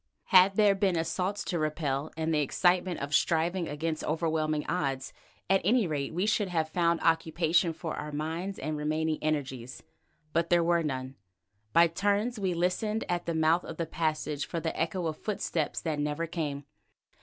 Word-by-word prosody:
Had 190 +1 +7
there 210 -1 +5
been 195 -2 +1
assaults 180 +4 -1
to 175 - -2
repel 155 -2 -1
and 160 0 0
the 150 - +2
excitement 175 +4 +2
of 140 +1 -4
striving 170 +3 +2
against 155 +2 -3
overwhelming 155 -1 0
odds, 135 -6 -2 0.3
at 195 +1 +3
any 225 +4 +3
rate 145 -4 -2
we 180 +4 0
should 215 -1 +1
have 165 -3 0
found 170 0 +1
occupation 165 +1 +2
for 160 0 -5
our 150 - -5
minds 165 +6 -3
and 155 +2 -3
remaining 155 +1 -1
energies. 135 -5 -3 0.5
But 170 0 +1
there 175 -1 +4
were 170 0 +3
none. 130 -3 -4 0.5
By 170 +7 +6
turns 205 +7 0
we 185 -3 0
listened 195 +6 0
at 175 -1 -1
the 170 - -1
mouth 160 +2 +3
of 165 - -8
the 170 - -1
passage 155 -2 -2
for 170 - -3
the 160 0 -3
echo 170 +2 -1
of 155 -1 -2
footsteps 175 -7 -2
that 155 -3 -2
never 150 +3 -1
came. 150 -4 -3
165 Hz, 175 wpm, -29 LUFS, 155-180 Hz, 0.5 s, Had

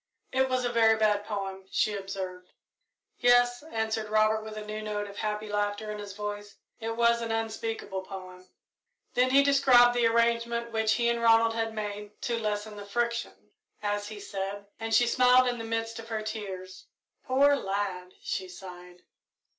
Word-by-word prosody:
"It 265 0 +2
was 255 -1 0
a 240 - 0
very 225 -2 +4
bad 210 -1 +2
poem," 195 -2 -5
she 215 - +1
observed. 190 -2 -6 0.7
"Yes," 245 0 +4
answered 220 -6 -3
Robert, 215 0 +3
with 215 0 -8
a 210 - -6
new 215 0 -5
note 210 -1 -3
of 200 0 -11
happy 210 0 -2
laughter 205 +1 -2
in 210 - -6
his 205 -1 -7
voice; 205 0 -6 0.2
"it 225 0 -3
was 235 0 +3
an 230 -1 -3
unspeakable 225 -3 -3
poem." 185 -1 -10 0.6
Then 250 +1 +3
he 275 +2 +6
described 265 -4 +6
the 240 -1 +3
arrangement 235 0 +1
which 220 -1 +2
he 235 -1 +1
and 235 0 +1
Ronald 230 0 +5
had 225 -1 -2
made 210 -1 -6
"to 235 -1 -1
lessen 210 -1 -3
the 205 - -8
friction," 235 +2 -3 0.3
as 205 0 -1
he 210 -1 -8
said, 200 0 -5
and 225 0 -4
she 225 +2 +5
smiled 250 +1 +5
in 245 -1 -1
the - - -4
midst 225 0 -3
of 225 - -9
her 220 -1 -2
tears. 190 -4 -6 0.4
"Poor 280 +2 +4
lad!" 195 -5 -3
she 185 -1 -3
sighed. 180 -1 -11
220 Hz, 175 wpm, -28 LUFS, 205-235 Hz, 0.7 s, he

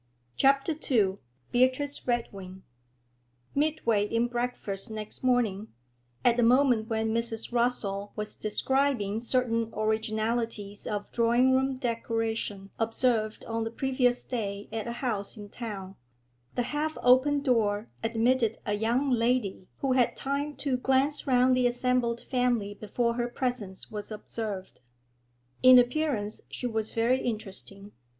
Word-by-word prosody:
CHAPTER 275 - +3 0.2
II 200 -6 +2 0.3
BEATRICE 260 +4 +1
REDWING 195 -6 -3 0.9
Midway 280 -9 +1
in 230 +2 +1
breakfast 240 -5 -3
next 215 +1 -7
morning, 225 -5 +1 0.6
at 240 0 +4
a - - +5
moment 245 -2 +4
when 220 0 0
Mrs. 230 0 -3
Rossall 205 -5 0
was 210 0 -4
describing 225 -1 0
certain 230 -2 0
originalities 220 -1 -1
of 205 -1 -3
drawing 240 +2 +3
room 265 0 +2
decoration 225 -5 -2
observed 225 -1 0
on 225 0 -2
the 225 - -2
previous 250 0 +1
day 205 -5 -4
at 225 0 -3
a - - -2
house 210 -3 -2
in 205 -1 -9
town, 200 -5 -7 0.6
the 245 - +1
half 310 +1 -1
open 260 +3 +5
door 220 -5 +1
admitted 230 0 +1
a 210 - 0
young 235 +6 +1
lady 230 -6 +1
who 270 - +1
had 255 -2 +3
time 280 +2 -2
to 265 -1 -1
glance 270 +4 +1
round 255 0 +4
the 250 -1 +3
assembled 245 -1 0
family 245 -5 0
before 235 +3 -1
her 240 0 -1
presence 240 -7 -4
was 210 -1 -6
observed. 210 -2 -6 0.8
In 255 0 +9
appearance 245 -4 +1
she - - -6
was 220 -2 -1
very 235 +3 +2
interesting. 205 -3 -5
235 Hz, 130 wpm, -28 LUFS, 215-255 Hz, 0.9 s, In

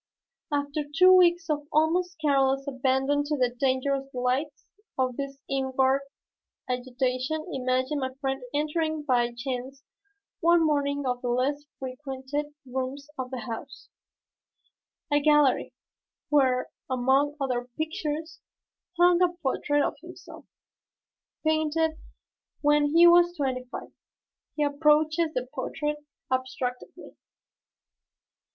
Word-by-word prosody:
After 285 +1 -1 0.2
two 370 +1 +8
weeks 345 -1 +4
of 295 -2 -2
almost 350 +4 +2
careless 275 -2 +2
abandon 270 +2 +1
to 300 0 -1
the 250 -2 +1
dangerous 270 +1 0
delights 260 +4 -2 0.3
of 255 -2 0
this 275 0 -5
inward 265 0 +1 0.7
agitation 255 +4 -2
imagine 260 +2 0
my 260 -1 -2
friend 270 -1 -2
entering 310 +1 -1
by 245 -4 +2
chance 260 +2 -5 0.6
one 340 0 +4
morning 285 -1 0
one - - -7
of - - -27
the 250 - -3
less 275 +4 0
frequented 265 +2 -5 0.2
rooms 265 +3 -4
of 260 -2 -4
the 255 -2 -5
house, 240 +4 -8 1.2
a 290 - +5
gallery, 295 -2 +3 0.6
where, 260 -4 +2 0.2
among 265 +3 +2
other 250 -2 -2
pictures, 315 0 -3 0.6
hung 350 0 +5
a 360 - +5
portrait 290 +2 +1
of - - -1
himself, - - -12 1.0
painted 315 +1 +2 0.7
when 295 0 +3
he 340 +1 +8
was 345 0 +6
twenty 260 -3 -1
five. - - -7 0.6
He 300 - +1
approaches 305 +2 +2
the 250 0 -1
portrait 295 +3 -3 0.3
abstractedly. 255 -1 -4
280 Hz, 115 wpm, -27 LUFS, 260-305 Hz, 1.2 s, two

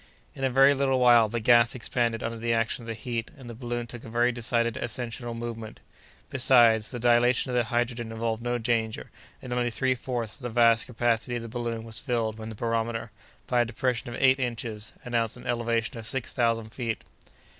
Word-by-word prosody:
In 135 - -7
a 135 - +3
very 135 +2 +6
little 135 -1 +1
while, 120 -3 +6
the 120 +2 -2
gas 120 +1 +5
expanded 120 -2 -1
under 115 0 -3
the 115 0 +1
action 115 +1 0
of 115 - -11
the 115 - -3
heat, 115 0 -4
and 130 -3 -11
the 120 - -7
balloon 120 0 -4
took 120 0 -9
a - - -9
very 120 +2 +2
decided 115 -1 0
ascensional 120 0 -4
movement. 115 -2 -6 0.5
Besides, 120 -4 +4
the 125 - -6
dilation 120 +2 +3
of - - -2
the 120 -1 +2
hydrogen 120 0 -1
involved 115 0 -2
no 120 0 -1
danger, 115 -2 -1 0.3
and 125 - -4
only 120 0 +1
three 130 +2 +1
fourths 120 -3 -4
of - - -19
the 120 - -4
vast 115 -1 +4
capacity 120 0 0
of 120 - -3
the - - -6
balloon 115 -1 -3
was 115 -1 -5
filled 115 -4 -2
when 110 0 -6
the 110 - -7
barometer, 115 0 -2 0.3
by 125 -1 +2
a - - +2
depression 120 +1 -2
of 120 - -6
eight 130 0 +5
inches, 115 -4 -4
announced 115 -2 -1
an - - -12
elevation 115 -1 -1
of 110 - -7
six 130 +1 -2
thousand 115 -3 0
feet. 115 -2 -3
120 Hz, 210 wpm, -27 LUFS, 115-120 Hz, 0.5 s, very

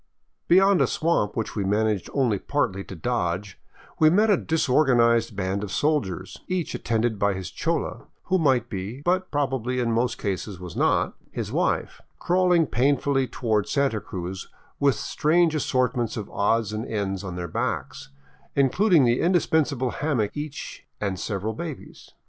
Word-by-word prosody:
Beyond 190 -1 +5
a 135 - +4
swamp 155 -11 0
which 110 - -3
we 105 - -1
managed 105 0 0
only 120 -8 +1
partly 110 -9 -1
to 95 - -8
dodge 95 -1 -2 0.4
we 155 - +7
met 210 +6 +4
a - - +6
disorganized 125 -7 +2
band 95 +1 -2
of 100 - -5
soldiers, 145 - -1
each 180 -4 -2
attended 115 -2 -1
by 100 -1 +2
his 95 -2 -6
chola, - - -2 0.2
who 190 0 +1
might 130 -7 +2
be, 105 +4 -5
but 185 +1 +1
probably 130 -4 -1
in 120 -2 0
most 120 +2 0
cases 100 -1 -4
was 90 -2 -8
not, - - +2 0.2
his - - -5
wife, - - -1 0.2
crawling 180 -2 +3
painfully 135 +1 +1
toward 110 -5 -1
Santa 135 -7 +1
Cruz 95 +1 -6 0.3
with 140 -2 +3
strange 165 +1 +2
assortments 125 -6 0
of 105 - -6
odds 110 +1 +1
and 110 +1 -3
ends 100 -3 -2
on 90 -2 -5
their 90 -1 -4
backs, - - -3 0.5
including 160 - +4
the 120 0 +2
indispensable 155 -7 +1
hammock 135 -9 -1
each 150 -1 -6 0.2
and 95 -3 -2
several 105 +1 -3
babies. 155 +4 -8
120 Hz, 155 wpm, -25 LUFS, 105-150 Hz, 0.5 s, we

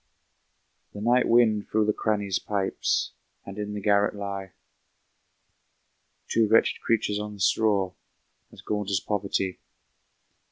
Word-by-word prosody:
The 105 - -8
night 120 +3 +3
wind 110 -3 +3
through 110 0 +2
the 105 - +2
crannies 100 -3 -1
pipes, 100 -2 -1 0.3
And 100 +1 -8
in 105 0 -4
the - - -3
garret 100 0 +2
lie 100 -2 -5 1.7
Two 115 -1 +2
wretched 110 +2 +3
creatures 105 -2 0
on 105 0 -6
the - - -15
straw, 100 -2 +2 0.6
As - - -14
gaunt 105 -2 -2
as 95 -2 +1
poverty. 100 -2 -2
105 Hz, 125 wpm, -26 LUFS, 100-110 Hz, 1.7 s, night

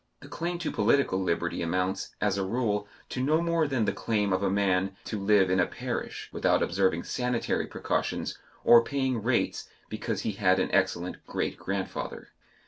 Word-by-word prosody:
The - - -11
claim 175 +1 -3
to 170 -2 -3
political 105 -2 +2
liberty 90 -3 -1
amounts, 90 +3 -1
as 105 -2 +1
a 100 - -1
rule, 105 0 -1 0.2
to 125 - -3
no 150 +4 +3
more 170 -2 +1
than 130 -6 0
the - - 0
claim 105 -3 0
of 95 - +1
a 100 - +1
man 95 -1 +1
to 110 - -4
live 100 -2 +4
in 95 - +3
a 90 - +3
parish - - -5
without - - +2
observing 95 -2 +1
sanitary 125 -1 -1
precautions - - -2 0.3
or 120 -1 +8
paying 130 -2 -1
rates 120 +3 0 0.2
because - - -3
he - - -1
had 95 -2 +3
an - - 0
excellent 90 -2 0
great - - -2
grandfather. 95 0 -4
105 Hz, 175 wpm, -28 LUFS, 95-125 Hz, 0.3 s, or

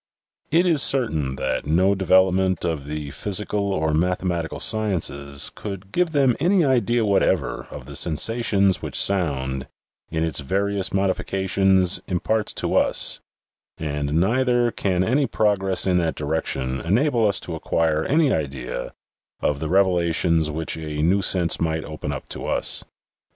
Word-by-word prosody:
It 170 +4 +3
is 165 -6 +3
certain 80 - +2
that 65 +1 -3
no 90 +6 +3
devel 95 -1 +4
opment 95 -2 0
of 80 -5 -3
the 75 -1 -5
physical 100 +5 -1
or 80 -4 0
mathematical 85 0 -1
sciences 80 -10 +1
could 95 -2 -8
give 180 -1 +1
them 135 -5 +2
any 180 -1 +3
idea 120 -3 +1
whatever 100 -2 0
of - - -9
the 70 +1 -9
sensations 100 - +1
which - - -2
sound, 70 -9 0 0.4
in 80 0 -2
its 80 -2 0
various 100 +6 -1
modifications, 95 -1 +1
imparts 105 +4 -1
to - - -2
us, - - +2 0.6
and 75 -2 -3
neither 120 +4 +2
can 90 -4 -1
any 135 +7 +1
progress 95 -3 +1
in 90 -2 +2
that 80 -2 -1
direction 70 -4 -2
enable 115 - +1
us 100 -2 0
to 85 - -6
acquire 80 -1 0
any 150 -1 +2
idea 65 -5 -4 0.4
of 70 -1 -1
the 80 - -4
revelations 85 -3 +2
which 80 +2 -3
a 75 -2 -4
new 95 +5 +2
sense 90 -3 +2
might 80 -1 -1
open 75 -1 -6
up 70 - -6
to - - -5
us. - - +1
90 Hz, 145 wpm, -22 LUFS, 80-105 Hz, 0.6 s, devel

